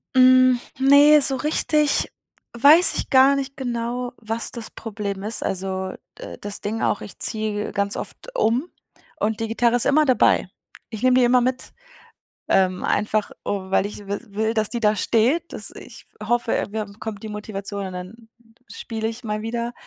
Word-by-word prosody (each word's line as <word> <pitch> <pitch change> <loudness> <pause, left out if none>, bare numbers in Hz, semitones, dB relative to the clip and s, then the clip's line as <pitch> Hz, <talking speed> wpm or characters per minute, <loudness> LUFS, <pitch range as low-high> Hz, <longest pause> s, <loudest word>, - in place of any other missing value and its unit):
Hm, 255 -1 +6 0.2
ne, 285 +3 +7
so 270 -1 +3
richtig 300 +1 +1 0.4
weiß 295 +9 +6
ich - - -3
gar 270 +1 +6
nicht 275 0 -4
genau, 245 -1 -3
was 225 +1 -4
das 235 -3 -6
Problem 200 -3 -6
ist 215 +2 -1
also, 190 0 -3 0.2
äh, - - -9
das 205 0 -5
Ding 220 +2 -3
auch, - - 0
ich - - -10
ziehe 215 -2 -1
ganz 200 0 -1
oft - - -8
um 260 - 0 0.5
und 220 +1 -1
die 225 - -2
Gitarre 235 +1 +2
ist 245 - +2
immer 305 +2 +4
dabei. 255 -2 +3 0.4
Ich 220 +1 -7
nehme 255 0 +4
die 245 - +4
immer 250 0 +4
mit, 255 +1 -3 0.8
ähm, 185 -1 +2
einfach, 215 0 0
o 190 -2 -4
weil 195 - +2
ich 205 0 -8
wis 200 +1 -6
will, 220 +2 0
dass 220 -2 0
die 235 0 -4
da 210 -1 +2
steht, 250 - +1
dass - - -6
ich - - -12 0.2
hoffe, 235 +2 0
äh, - - +1
irgendwann 210 0 -5
kommt 220 -1 -7
die 215 - -6
Motivation 200 -1 -5
und 185 - -8
dann 215 +6 -10 0.4
spiele 220 +1 -5
ich 230 +2 -7
mal 215 -1 -3
wieder, 235 +1 -4
225 Hz, 180 wpm, -22 LUFS, 210-255 Hz, 0.8 s, ne